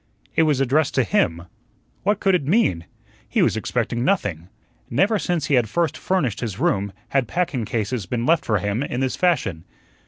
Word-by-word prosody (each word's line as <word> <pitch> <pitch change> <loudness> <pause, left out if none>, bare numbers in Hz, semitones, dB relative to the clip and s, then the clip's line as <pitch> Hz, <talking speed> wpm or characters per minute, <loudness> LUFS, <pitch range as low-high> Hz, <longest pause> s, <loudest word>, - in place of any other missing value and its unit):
It - - +4
was 145 -3 +2
addressed 135 +3 +2
to 130 - +4
him. 85 -5 +1 0.6
What 205 +1 +1
could 195 - +2
it 145 -7 +1
mean? 120 - +2 0.4
He - - +2
was - - +2
expecting 120 +1 -1
nothing. 100 - -1 0.4
Never 200 - +2
since 175 -5 -1
he - - -1
had 120 -5 +3
first 170 +5 0
furnished 155 - -1
his 110 -6 -4
room 100 -1 0 0.2
had 135 -4 +1
packing 150 -8 -1
cases 110 -2 -2
been 120 +4 -2
left 165 +2 +3
for 110 - +1
him 100 +4 -1
in 130 -3 -3
this 130 -1 0
fashion. 105 - 0
130 Hz, 185 wpm, -22 LUFS, 105-170 Hz, 0.6 s, It